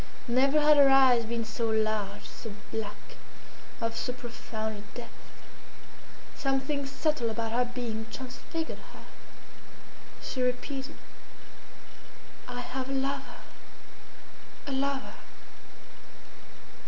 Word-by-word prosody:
Never 270 +5 +5
had 300 0 +7
her 280 -1 +9
eyes 260 -3 +7
been 230 0 -1
so 225 +1 -1
large, 215 -2 0
so 220 -3 -8 0.2
black, 210 -2 -5 0.6
of 230 -1 -1
so 240 - 0
profound 220 -3 -4
a 210 - -12
depth. 240 - -7 1.2
Something 270 +1 0
subtle 275 -3 +1
about 225 0 -1
her 245 +2 +3
being 225 -3 -3
transfigured 265 +5 -4 0.2
her. - - -12 1.2
She 255 - -2
repeated, 265 +3 -1 1.5
"I 245 0 -3
have 260 +1 -3
a - - -1
lover! 270 +1 -1 1.2
a 280 - -3
lover!" 275 0 0
250 Hz, 105 wpm, -30 LUFS, 225-270 Hz, 1.5 s, her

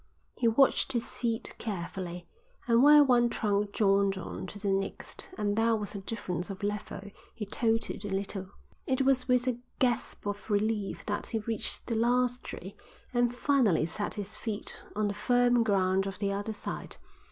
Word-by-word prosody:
He 235 - +1
watched 270 +3 +4
his 235 -2 0
feet 230 -2 -1
carefully, 180 -3 -5 0.4
and 235 0 +5
where 295 +1 +9
one 240 -3 +4
trunk 205 -3 0
joined 200 -2 +3
on 185 +1 -6
to 205 - -8
the 200 -1 -1
next 195 - -3
and 205 -1 0
there 225 +1 +3
was 210 -1 -4
a 200 - -4
difference 190 -4 -4
of 195 0 -7
level, 205 -1 -3 0.3
he 215 - -4
tottered 225 +1 0
a 205 - -4
little. 195 0 -3 0.4
It 265 0 +2
was 265 -1 +3
with 250 0 +3
a 245 -2 0 0.2
gasp 245 -5 0
of 205 +2 -4
relief 210 -1 0
that 205 -1 -2
he 225 - -1
reached 220 0 -2
the 235 - -2
last 245 +2 +2
tree 190 +3 -8 0.4
and 240 0 +2
finally 245 - +3
set 205 +5 -4
his 205 0 -5
feet 210 -1 -5 0.2
on 210 0 +1
the 205 - -1
firm 245 +2 +3
ground 195 -3 +2
of 195 -1 -5
the 200 -1 -1
other 205 +2 -3
side. - - -5
215 Hz, 175 wpm, -30 LUFS, 200-240 Hz, 0.4 s, where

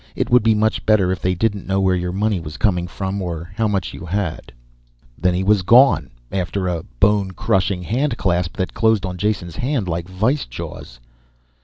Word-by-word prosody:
It - - -2
would 125 - +6
be 110 0 +3
much 110 +1 +1
better 100 -4 +4
if 95 - -3
they 90 0 +1
didn't 100 0 -1
know 95 0 +1
where 95 -1 +2
your 90 0 -2
money 100 +1 0
was 80 -1 -8
coming 90 -5 +1
from 95 +2 -4
or 85 -1 -5
how 110 -1 +1
much 100 -3 -2
you - - -9
had." 90 -3 -3 0.6
Then 90 +4 +1
he 95 - 0
was 100 0 +3
gone, 125 +9 +5 0.2
after 95 0 -2
a 85 -2 -1 0.2
bone 100 -1 +3
crushing 95 -3 0
handclasp 95 - -1
that 95 - -2
closed 110 -3 +2
on 90 -1 -5
Jason's 95 -4 -2
hand 125 -6 -1
like 85 +1 -3
vise 110 +10 0
jaws. - - -8
95 Hz, 190 wpm, -20 LUFS, 90-105 Hz, 0.6 s, would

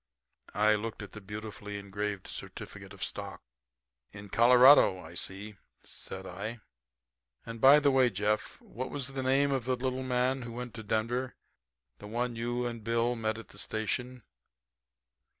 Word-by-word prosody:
I 105 +1 +4
looked 110 0 -3
at 100 - -10
the 105 - -9
beautifully 105 0 -7
engraved 100 0 -4
certificate - - -8
of - - -7
stock. - - -5 0.7
"In 100 0 -10
Colorado, 125 -2 +7
I 80 -1 -11
see," 95 +3 -5 0.3
said 95 0 -6
I. 105 +5 -6 0.8
"And, 115 -1 -7
by 140 +3 +9
the 145 -1 +3
way, 130 -2 +5
Jeff, 105 +1 -1
what 130 +4 -6
was 140 -2 -3
the 135 -1 -4
name 135 +2 +3
of 130 -4 -1
the 130 0 +1
little 130 +1 -2
man 130 +1 +1
who 120 -1 -7
went 125 0 -6
to 110 - -7
Denver 115 +4 -1 0.6
the 105 - -9
one 120 +2 -2
you 120 +2 -2
and 115 -2 -4
Bill 115 +2 +1
met 110 -1 -1
at 115 - -10
the - - -10
station?" 125 +3 -3
115 Hz, 160 wpm, -30 LUFS, 105-125 Hz, 0.8 s, by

